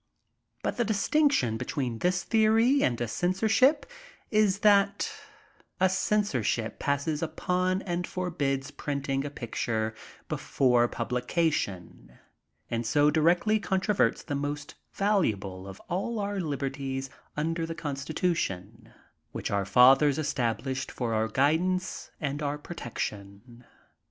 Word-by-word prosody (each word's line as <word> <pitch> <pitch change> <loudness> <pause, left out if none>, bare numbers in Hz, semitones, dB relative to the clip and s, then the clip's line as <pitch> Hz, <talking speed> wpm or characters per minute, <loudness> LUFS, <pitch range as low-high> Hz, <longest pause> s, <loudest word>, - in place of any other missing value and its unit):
But - - -2
the 240 - +2
distinction 220 - +2
between 125 -3 -3
thu - - +2
dieory 220 +8 +3
and 120 -2 +1
a 120 - -1
cen 175 +11 0
sorship 240 +9 +3 0.5
is 210 -2 +3
that 200 -1 +3 0.7
a 190 0 +4
censorship 180 - 0
passes 145 +2 -1
iq>on 185 +3 0
and 175 -1 -2
forbids 145 -7 -2
printing 140 -2 -2
a 145 - -4
picture 110 -4 -2 0.3
BEFORE 125 -3 +2
PUBLICATION, 125 - -2 0.5
and 115 0 -1
so 145 +6 +3
direcdy 175 +7 +3
controverts 190 - +1
the - - -4
most 145 0 -3 0.2
valuable 105 - 0
of 95 -1 -9
all 200 +7 -2
our 205 -1 -2
liberties 135 -4 -3 0.3
under 165 +2 -1
the 165 - -5
Constitution, 135 - -3 0.4
which - - -4
our 100 -1 0
fathers 135 +6 +6
established 130 -2 -1
for 120 -3 -2
our 110 0 +1
guidance 165 - 0
and 145 -1 -3
our 145 0 -1
protection. 120 - -7
145 Hz, 115 wpm, -28 LUFS, 125-185 Hz, 0.7 s, fathers